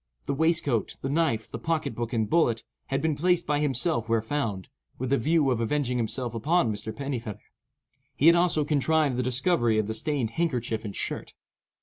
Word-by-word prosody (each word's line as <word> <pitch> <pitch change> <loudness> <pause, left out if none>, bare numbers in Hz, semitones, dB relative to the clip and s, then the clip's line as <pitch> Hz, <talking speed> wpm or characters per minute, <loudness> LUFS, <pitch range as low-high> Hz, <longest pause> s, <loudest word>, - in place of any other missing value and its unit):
The - - -1
waistcoat, 145 - +1
the 135 - -2
knife, 145 -8 +1
the - - -7
pocket 160 -6 -1
book, 120 0 -4
and 110 -3 0
bullet, 120 -4 +2 0.2
had 135 +2 -1
been 160 -2 +1
placed 175 +2 +2
by 145 0 +1
himself 135 -4 0
where 115 0 +3
found, 110 - -3 0.3
with 130 +1 -3
the 140 - +4
view 150 +1 +2
of 120 -2 0
avenging 125 +1 0
himself 120 +1 -2
upon 120 +1 +1
Mr. 105 +1 -5
Pennifeather. 120 -5 -4 0.8
He 145 - 0
had 170 +1 +8
also 170 -4 +3
contrived 150 -1 +2
the - - +1
discovery 125 -2 +1
of 110 - +1
the 110 - -3
stained 130 -1 -1
handkerchief 120 -7 -1
and 100 -3 -6
shirt. - - -4
135 Hz, 190 wpm, -27 LUFS, 115-155 Hz, 0.8 s, had